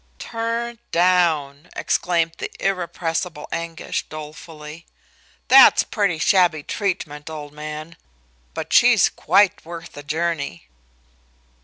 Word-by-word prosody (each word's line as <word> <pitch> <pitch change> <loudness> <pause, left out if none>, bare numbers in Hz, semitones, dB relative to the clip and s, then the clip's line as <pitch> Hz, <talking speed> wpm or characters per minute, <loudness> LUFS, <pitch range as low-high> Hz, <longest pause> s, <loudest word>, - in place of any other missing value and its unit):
"Turned 230 - -4
down!" 170 -4 +1
exclaimed 165 -1 0
the - - -4
irrepressible 170 -3 -2
Anguish, 165 -1 -4
dolefully. 155 +1 -10 0.6
"That's - - +8
pretty 200 -7 -1
shabby 170 -3 +3
treatment, 160 -7 -4
old 150 -2 -8
man. 155 +2 -7 0.6
But - - -5
she's - - +6
quite 195 +3 +2
worth 170 +1 -9
the 145 - -10
journey." 150 - -3
165 Hz, 100 wpm, -21 LUFS, 150-180 Hz, 0.6 s, That's